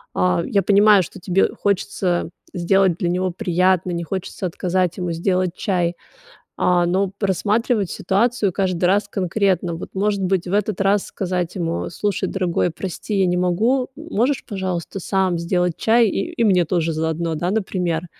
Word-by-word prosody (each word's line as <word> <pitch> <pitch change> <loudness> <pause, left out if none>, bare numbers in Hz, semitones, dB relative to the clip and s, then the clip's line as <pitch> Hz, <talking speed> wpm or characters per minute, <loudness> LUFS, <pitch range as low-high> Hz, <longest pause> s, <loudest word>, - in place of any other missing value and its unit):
Э, 180 -2 +2
я 200 - +1
понимаю, 205 0 +5
что - - -10
тебе 185 +1 +2
хочется 185 -3 -1 0.2
сделать 185 0 +2
для 175 -3 -1
него 185 +1 0
приятно, 180 -1 +1
не 170 0 -2
хочется 190 +2 -5
отказать 180 +1 -1
ему 180 -2 -2
сделать 180 +1 0
чай, 180 -4 0 0.7
э, 175 -1 +3
но 190 +2 +1
просматривать 205 +2 0
ситуацию 210 0 +1
каждый 185 -2 -1
раз 200 +3 +2
конкретно. 185 -2 0
Вот 165 - -7
может 200 0 0
быть, 185 -1 0
в 180 - -4
этот 205 -1 0
раз 195 +1 +2
сказать 180 -1 -3
ему: 170 -1 -2
"Слушай, 205 +2 -2
дорогой, 180 -2 0
прости, 190 +4 -5
я 190 - +3
не 180 0 +1
могу. 220 +9 +1
Можешь, 285 -4 -1
пожалуйста, 190 -3 -4
сам 190 -1 0
сделать 180 0 0
чай, 230 +1 +4
и 195 - -2
и 235 - 0
мне 180 -4 +4
тоже 165 -1 0
заодно." 160 +1 -1
Да, 175 +4 -1
например? 180 -5 -1
185 Hz, 160 wpm, -21 LUFS, 175-200 Hz, 0.7 s, понимаю